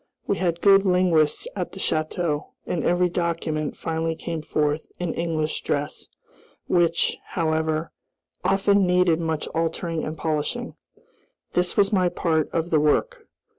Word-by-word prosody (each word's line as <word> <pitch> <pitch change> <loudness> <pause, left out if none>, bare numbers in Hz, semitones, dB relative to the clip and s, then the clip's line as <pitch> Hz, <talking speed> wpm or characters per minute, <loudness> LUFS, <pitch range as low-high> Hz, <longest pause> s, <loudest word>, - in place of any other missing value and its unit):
We 200 - 0
had 170 -2 -1
good 195 -1 +6
linguists 180 - +2
at - - -4
the - - -8
château, 155 -1 -1 0.2
and 170 - -2
every 180 +1 +3
document 165 -3 -2
finally 160 0 -2
came 165 0 -4
forth 150 0 -1
in 175 -2 -2
English 160 -2 -2
dress, 145 0 -3 0.6
which, 170 -1 +2
however, 160 -1 -1 0.5
often 200 0 +3
needed 180 -2 +3
much 160 -2 -1
altering 165 0 -2
and 155 +1 -4
polishing. 155 -2 -2 0.8
This 180 0 +1
was 200 +1 +3
my 185 -2 +3
part 160 -3 0
of 165 +1 -1
the 155 - +4
work. 150 0 +1
165 Hz, 135 wpm, -24 LUFS, 155-180 Hz, 0.8 s, good